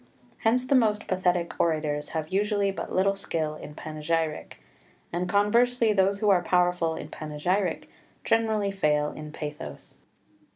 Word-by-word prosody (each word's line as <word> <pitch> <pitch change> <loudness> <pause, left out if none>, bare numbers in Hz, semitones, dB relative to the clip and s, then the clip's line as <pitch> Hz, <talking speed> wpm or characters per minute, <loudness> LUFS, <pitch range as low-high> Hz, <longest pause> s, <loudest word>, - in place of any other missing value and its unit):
Hence 250 +3 +2
the 270 - +1
most 220 -5 +3
pathetic 180 -2 0
orators 155 -3 0
have 155 0 -3
usually 200 0 +1
but 195 - -6
little 195 +1 +2
skill 165 -6 -2
in 150 -1 -10
panegyric, 155 - -3 0.5
and 180 +1 -1
conversely 230 +3 +3
those 195 0 +2
who 210 -2 +4
are 185 -2 +4
powerful 175 -2 +1
in - - -6
panegyric 160 +6 -2 0.4
generally 220 -3 +1
fail 150 -6 +1
in 150 0 -8
pathos. 150 0 -8
180 Hz, 135 wpm, -27 LUFS, 155-205 Hz, 0.5 s, who